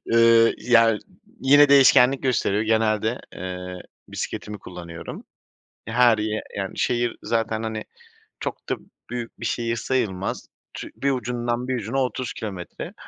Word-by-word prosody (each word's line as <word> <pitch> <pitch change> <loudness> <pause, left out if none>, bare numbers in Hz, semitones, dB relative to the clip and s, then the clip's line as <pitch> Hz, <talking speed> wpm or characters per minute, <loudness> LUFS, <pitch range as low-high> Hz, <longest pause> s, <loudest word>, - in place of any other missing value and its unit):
Iıı, 115 0 +6
yani, 115 -3 +4 0.4
yine 145 +2 +6
değişkenlik 135 -1 +6
gösteriyor, 110 -5 +1
genelde, 110 +1 +1
eee, 90 0 -6 0.3
bisikletimi 105 0 -5
kullanıyorum. 85 -2 -9 0.6
Ya, 115 - -5
her 120 -2 +5
yer 110 0 -2 0.2
yani, 95 -1 -4
şehir 120 -1 0
zaten, 115 -1 -1
hani, 110 -1 -3 0.6
çok - - -5
da - - 0 0.3
büyük 120 -1 -6
bir - - -3
şehir 115 -1 -1
sayılmaz. 105 -6 -2 0.3
Ç - - -6
bir 140 - 0
ucundan 120 0 -2
bir 130 - 0
ucuna, 120 +3 -3
30 125 0 -3
kilometre, 95 -6 -7
115 Hz, 135 wpm, -24 LUFS, 105-125 Hz, 0.6 s, Iıı